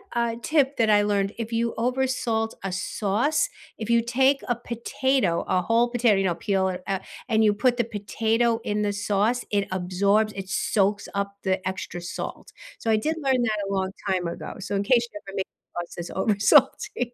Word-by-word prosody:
uh, 235 Hz, -1 st, +1 dB
tip 285 Hz, +1 st, +2 dB
that 225 Hz, -2 st, +3 dB
I 205 Hz, -1 st, +6 dB
learned, 200 Hz, -1 st, 0 dB
if 230 Hz, 0 st, -4 dB
you 230 Hz, 0 st, 0 dB
over 255 Hz, +3 st, +1 dB
salt 225 Hz, -3 st, -1 dB
a 195 Hz, -, -2 dB
sauce, 220 Hz, +10 st, 0 dB, 0.3 s
if 220 Hz, 0 st, -5 dB
you 235 Hz, 0 st, +4 dB
take 265 Hz, +4 st, +2 dB
a 245 Hz, -, +1 dB
potato, 235 Hz, -4 st, 0 dB
a 185 Hz, -, +2 dB
whole 230 Hz, +5 st, +2 dB
potato, 240 Hz, -3 st, +3 dB
you 195 Hz, -, +1 dB
know, 175 Hz, -3 st, +1 dB
peel 190 Hz, +1 st, 0 dB
it 180 Hz, 0 st, -4 dB
up, 195 Hz, -1 st, -1 dB, 0.3 s
and 220 Hz, -2 st, +3 dB
you 210 Hz, -1 st, +5 dB
put 245 Hz, +4 st, +2 dB
the 240 Hz, -, +2 dB
potato 225 Hz, +2 st, 0 dB
in 210 Hz, 0 st, -1 dB
the 205 Hz, -1 st, 0 dB
sauce, 205 Hz, +4 st, 0 dB
it 200 Hz, -1 st, +1 dB
absorbs, 200 Hz, +4 st, +1 dB
it 190 Hz, -, -5 dB
soaks 200 Hz, +1 st, +1 dB
up 200 Hz, 0 st, -2 dB
the 190 Hz, -1 st, 0 dB
extra 185 Hz, -2 st, -4 dB
salt, 175 Hz, +5 st, -6 dB, 0.3 s
so 225 Hz, -, -3 dB
I 220 Hz, -, +5 dB
did 310 Hz, +9 st, -1 dB
learn 265 Hz, -2 st, +2 dB
that 220 Hz, -3 st, +1 dB
a -, -, -4 dB
long 190 Hz, -1 st, -1 dB, 0.2 s
time 185 Hz, -2 st, 0 dB
ago, 170 Hz, -, -6 dB
so 200 Hz, +1 st, -5 dB
in 200 Hz, -, +1 dB
case 235 Hz, +2 st, +3 dB
you 205 Hz, -, -6 dB
ever 195 Hz, -, -8 dB
make 190 Hz, -, -1 dB, 0.3 s
sauce 175 Hz, 0 st, -5 dB
that's 175 Hz, 0 st, -6 dB
over 205 Hz, +1 st, 0 dB
salty. 250 Hz, +1 st, +3 dB
215 Hz, 205 wpm, -25 LUFS, 195-240 Hz, 0.3 s, I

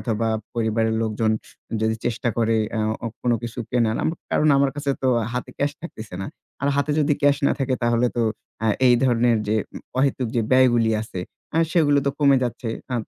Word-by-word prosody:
অথবা 115 Hz, -1 st, -1 dB, 0.3 s
পরিবারের 110 Hz, -1 st, +1 dB
লোকজন 110 Hz, 0 st, 0 dB, 0.5 s
যদি 110 Hz, 0 st, +1 dB
চেষ্টা 120 Hz, +1 st, -1 dB
করে 115 Hz, -1 st, +2 dB, 0.2 s
অ্যা 110 Hz, -1 st, -1 dB, 0.2 s
অ -, -, 0 dB, 0.2 s
কোনো 120 Hz, -1 st, +2 dB
কিছু 120 Hz, +1 st, -6 dB
কেনা। 120 Hz, -3 st, +2 dB, 0.4 s
কারণ 155 Hz, -, +3 dB
আমার 140 Hz, -1 st, +3 dB
কাছে 145 Hz, -1 st, -1 dB
তো 130 Hz, -, +2 dB, 0.2 s
হাতে 125 Hz, -, -4 dB
ক্যাশ 145 Hz, +1 st, +1 dB
থাকতেছে 110 Hz, -, -9 dB
না। -, -, -4 dB, 0.4 s
আর 140 Hz, -, +2 dB
হাতে 145 Hz, +1 st, +1 dB
যদি 145 Hz, 0 st, +2 dB
ক্যাশ 145 Hz, -1 st, +5 dB
না -, -, +3 dB
থাকে 130 Hz, -1 st, 0 dB
তাহলে 120 Hz, +1 st, +2 dB
তো 120 Hz, -, +2 dB, 0.4 s
আ -, -, +2 dB, 0.2 s
এই 120 Hz, -, +6 dB
ধরনের 120 Hz, -2 st, +3 dB
যে 110 Hz, -, +2 dB, 0.2 s
উম -, -, -7 dB, 0.2 s
অহেতুক 130 Hz, -2 st, +1 dB
যে -, -, +3 dB
ব্যয়গুলি 120 Hz, -3 st, +4 dB
আছে 95 Hz, -4 st, -6 dB, 0.3 s
অ্যা 165 Hz, -, +2 dB
সেগুলো 145 Hz, -5 st, +4 dB
তো -, -, +3 dB
কমে 140 Hz, -2 st, +5 dB
যাচ্ছে। 120 Hz, -1 st, -3 dB, 0.2 s
আ -, -, 0 dB
120 Hz, 195 wpm, -23 LUFS, 115-140 Hz, 0.5 s, এই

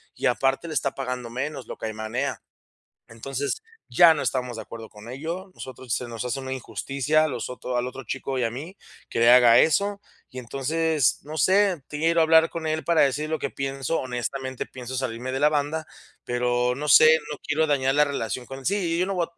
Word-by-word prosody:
y, -, -, 0 dB
aparte, 135 Hz, +5 st, +1 dB
le -, -, -4 dB
está 140 Hz, -, 0 dB
pagando 125 Hz, -3 st, -4 dB
menos, 135 Hz, +2 st, -4 dB
lo -, -, -7 dB
caimanea. 110 Hz, +5 st, -3 dB, 0.7 s
Entonces, 135 Hz, -, -4 dB, 0.3 s
ya 170 Hz, -2 st, +7 dB
no 150 Hz, -, -3 dB
estamos 125 Hz, -2 st, -2 dB
de 110 Hz, -, -6 dB
acuerdo 115 Hz, 0 st, -10 dB
con 105 Hz, +2 st, -13 dB
ello, 170 Hz, +8 st, -5 dB
nosotros 130 Hz, -2 st, -7 dB
se 125 Hz, -, -2 dB
nos 115 Hz, +1 st, -5 dB
hace 125 Hz, +2 st, -2 dB
una 130 Hz, 0 st, -6 dB
injusticia 140 Hz, +3 st, 0 dB
a -, -, +2 dB
los 125 Hz, -4 st, -4 dB
ot 125 Hz, -, -9 dB
al 120 Hz, +1 st, -1 dB
otro 135 Hz, +1 st, -8 dB
chico 135 Hz, +2 st, -4 dB
y 125 Hz, -, 0 dB
a 115 Hz, -, +1 dB
mí. 155 Hz, +10 st, -8 dB, 0.3 s
Que -, -, -2 dB
le 115 Hz, +1 st, +6 dB
haga 120 Hz, -2 st, +7 dB
eso, 200 Hz, +5 st, +2 dB, 0.3 s
y 130 Hz, -, -8 dB
entonces, 140 Hz, +2 st, 0 dB
no 155 Hz, +2 st, -7 dB
sé, 190 Hz, 0 st, +3 dB
quiero 165 Hz, +3 st, +1 dB
hablar 160 Hz, 0 st, +5 dB
con 160 Hz, -1 st, -5 dB
él 155 Hz, 0 st, -1 dB
para 170 Hz, +2 st, +3 dB
decir 145 Hz, +3 st, +1 dB
lo 160 Hz, -, -1 dB
que 140 Hz, -, -3 dB
pienso. 135 Hz, +3 st, -2 dB
Honestamente, 130 Hz, +1 st, -4 dB
pienso 130 Hz, 0 st, -7 dB
salirme 125 Hz, 0 st, -3 dB
de 135 Hz, -, -2 dB
la 150 Hz, +1 st, +5 dB
banda, 150 Hz, +1 st, -1 dB, 0.4 s
pero 125 Hz, 0 st, +1 dB
no 150 Hz, +2 st, -3 dB
sé, 155 Hz, +3 st, +8 dB
no 145 Hz, -, -5 dB
quiero 155 Hz, +1 st, +1 dB
dañar 135 Hz, -2 st, +1 dB
la 150 Hz, -, +6 dB
relación 130 Hz, -3 st, -3 dB
con 135 Hz, 0 st, -9 dB
sí, 200 Hz, -, +2 dB, 0.2 s
y -, -, -1 dB
yo 180 Hz, -, +2 dB
no 195 Hz, -, -2 dB
voy 170 Hz, -2 st, 0 dB
a -, -, -23 dB
135 Hz, 215 wpm, -25 LUFS, 125-155 Hz, 0.7 s, sé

